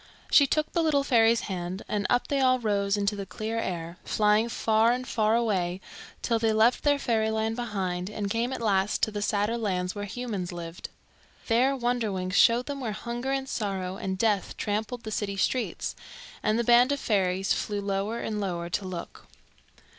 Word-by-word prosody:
She 280 - +7
took 305 +2 0
the 340 - +2
little 300 -4 +2
fairy's 230 -4 +4
hand, 185 0 -4
and 205 -2 -1
up 245 - +2
they 280 - 0
all 255 -1 +4
rose 205 -3 0
into 200 +1 0
the 200 -1 -6
clear 220 +5 -3
air, 170 -4 -4
flying 215 +2 +2
far 225 0 +3
and 255 +1 -2
far 220 -2 +2
away 190 -6 0 0.4
till 230 -2 +1
they 225 0 +2
left 225 +3 +4
their 290 -1 +3
fairyland 220 -3 0
behind 190 -6 -3
and 210 -1 -3
came 230 +5 -1
at 260 - -4
last 195 -2 +1
to 220 - +3
the 205 -1 -4
sadder 210 +3 0
lands 185 -4 -1
where 205 -1 -5
humans 205 -4 -4
lived. 170 -1 -7 0.6
There 255 +4 +3
Wonderwings 220 -7 -1
showed 235 +4 +5
them 285 -1 -5
where 225 -4 -2
hunger 240 +4 -4
and 270 0 -1
sorrow 195 -7 -3
and 190 -1 -3
death 210 -2 0
trampled 220 +3 -2
the 215 - -6
city 200 -2 -2
streets, 250 +5 -1 0.5
and 215 - +1
the 235 - +1
band 240 +3 +5
of 285 - 0
fairies 190 -4 +1
flew 205 -1 -2
lower 200 +3 -2
and 210 -1 -3
lower 175 -3 -3
to 195 - -1
look. 185 -2 -7
215 Hz, 185 wpm, -27 LUFS, 195-235 Hz, 0.6 s, She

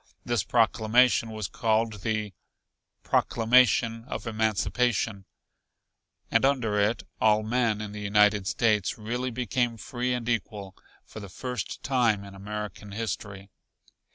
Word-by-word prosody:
This 120 -4 +1
proclamation 115 +1 +3
was 110 -3 -4
called 110 -1 0
the 110 -2 -2 0.7
"Proclamation 115 -1 +3
of 135 - -6
Emancipation," 110 -1 0 1.1
and - - +3
under 125 -7 +2
it 105 +3 +1 0.2
all 110 0 +4
men 115 -1 0
in 105 -1 -6
the 105 0 -7
United 105 -1 +3
States 105 -3 +1
really 120 +4 -3
became 120 0 -1
free 125 +2 -3
and 120 -2 -2
equal, 105 -4 -3 0.3
for - - -10
the 100 -2 -9
first 125 +3 -5
time 115 -6 +1
in 100 -1 -11
American 105 +1 -7
History. 100 -2 -5
110 Hz, 125 wpm, -27 LUFS, 105-120 Hz, 1.1 s, all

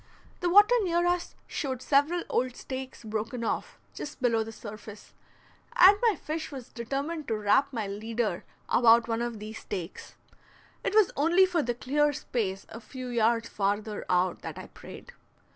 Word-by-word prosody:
The 355 - 0
water 410 +6 +7
near 345 -2 +1
us 350 0 -1
showed 260 -5 -3
several 290 +7 +2
old 250 0 -1
stakes 260 -2 -7
broken 225 +2 -4
off - - -3 0.2
just 295 - -7
below 230 -3 +2
the 225 - -8
surface, 215 -1 -10 0.6
and 415 -5 +8
my 455 -4 +3
fish 315 +1 -5
was 260 -4 -8
determined 280 +6 -4
to 225 - -1
wrap 210 +7 +2
my 225 -5 -3
leader 215 -1 -3 0.2
about 230 -1 +5
one 230 0 -1
of 240 -1 -3
these 215 +2 -8
stakes; 185 -3 -7 0.7
it 410 - -1
was 430 -4 +5
only 340 +6 +4
for 355 -3 0
the 240 -3 -2
clear 290 +4 +1
space 195 -8 -3
a 230 - -9
few 255 +2 -8
yards 230 -1 +1
farther 205 +1 -2
out 180 0 +1
that - - -7
I - - -9
prayed. - - -12
240 Hz, 165 wpm, -28 LUFS, 220-295 Hz, 0.7 s, and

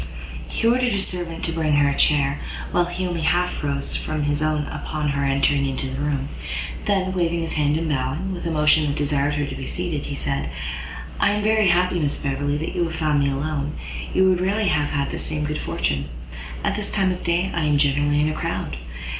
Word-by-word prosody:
He - - -2
ordered 245 0 +3
a - - +1
servant 175 -3 -4
to 165 - -1
bring 160 -2 +1
her 145 0 +5
a 140 - +1
chair, 140 -1 +3 0.3
while 175 0 +3
he 175 +1 -3
only 175 -2 -2
half 175 +2 +1
rose 140 -1 -2
from 155 -1 -2
his 145 +1 0
own 155 -1 +1
upon 150 0 -3
her 140 0 0
entering 140 0 +2
into 135 0 -2
the 135 +2 -3
room; 145 -1 -1 0.6
then, 190 -2 +1
waving 170 -2 +1
his 165 - -2
hand 150 0 +2
and 165 0 -1
bowing, 150 +7 -1
with 175 - -6
a - - 0
motion 150 -1 +4
that 140 - 0
desired 145 0 +1
her 145 0 0
to - - -5
be 135 - -5
seated, 170 -5 -3
he 140 - -4
said, 70 - -2 0.7
"I 200 - +4
am 210 0 -1
very 215 -1 +4
happy, 180 0 +3
Miss 145 -2 0
Beverley, 145 +1 -1
that 155 - -3
you 175 -2 +1
have 165 -1 -4
found 155 -2 +2
me 140 0 +3
alone; 145 +1 -2 0.4
you 190 0 +4
would 185 -1 +3
rarely 200 +2 +2
have 150 -1 +2
had 140 -2 -1
the - - -3
same 155 -1 -2
good 150 +1 -2
fortune. 70 0 -1 0.6
At - - +1
this 210 -1 -3
time 190 -2 +2
of 180 - -4
day 175 +2 +1
I 165 -2 0
am 150 -1 +3
generally 145 +1 +3
in 150 - +2
a - - -1
crowd. - - -3
150 Hz, 225 wpm, -23 LUFS, 145-175 Hz, 0.7 s, her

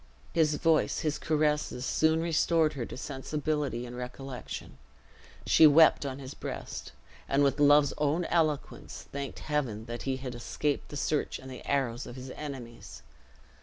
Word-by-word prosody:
His 155 -3 +3
voice, 165 0 +2
his 155 -3 -1
caresses, 150 -4 0
soon 160 +1 +2
restored 165 -1 +2
her 125 -5 -4
to - - -8
sensibility 140 -2 -2
and 120 0 -8
recollection. 125 - -7 0.7
She 160 - +7
wept 150 -1 +6
on 130 -1 -4
his 135 0 -8
breast, - - -6 0.4
and 140 +1 +3
with 140 +1 +2
love's 145 0 +6
own 150 +4 +1
eloquence, 155 -4 -1
thanked 140 0 -5
Heaven 130 -8 -2
that 120 0 -6
he 135 -1 -1
had 130 -1 -6
escaped 140 +4 -2
the 145 - -6
search 150 +1 -1
and 130 0 -10
the 130 - -9
arrows 130 -3 0
of 120 - -8
his 130 0 -8
enemies. 130 -6 -8
140 Hz, 155 wpm, -29 LUFS, 130-150 Hz, 0.7 s, She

